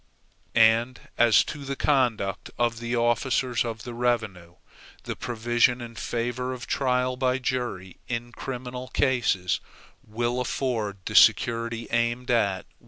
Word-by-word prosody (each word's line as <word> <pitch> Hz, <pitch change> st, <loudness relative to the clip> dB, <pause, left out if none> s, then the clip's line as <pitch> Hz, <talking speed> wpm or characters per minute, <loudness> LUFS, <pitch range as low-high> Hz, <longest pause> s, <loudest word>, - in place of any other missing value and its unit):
And 115 Hz, +2 st, +4 dB, 0.2 s
as 115 Hz, -4 st, +5 dB
to 150 Hz, -, -7 dB
the 140 Hz, 0 st, -4 dB
conduct 120 Hz, -9 st, 0 dB
of 120 Hz, -1 st, 0 dB
the 120 Hz, +1 st, -2 dB
officers 120 Hz, +1 st, +1 dB
of 115 Hz, -2 st, -5 dB
the 120 Hz, -, -7 dB
revenue, 110 Hz, -8 st, -2 dB, 0.5 s
the -, -, -4 dB
provision 120 Hz, +1 st, +1 dB
in 120 Hz, -1 st, -8 dB
favor 120 Hz, +2 st, -3 dB
of 125 Hz, 0 st, -7 dB
trial 125 Hz, -1 st, 0 dB
by 130 Hz, 0 st, +1 dB
jury 125 Hz, -8 st, -3 dB
in 120 Hz, 0 st, -4 dB
criminal 125 Hz, 0 st, -6 dB
cases, 120 Hz, -11 st, +1 dB, 0.4 s
will 120 Hz, +3 st, -2 dB
afford 115 Hz, -6 st, -2 dB
the -, -, -4 dB
security 115 Hz, 0 st, +4 dB
aimed 120 Hz, +1 st, 0 dB
at. 100 Hz, -5 st, +1 dB
120 Hz, 130 wpm, -26 LUFS, 115-125 Hz, 0.5 s, as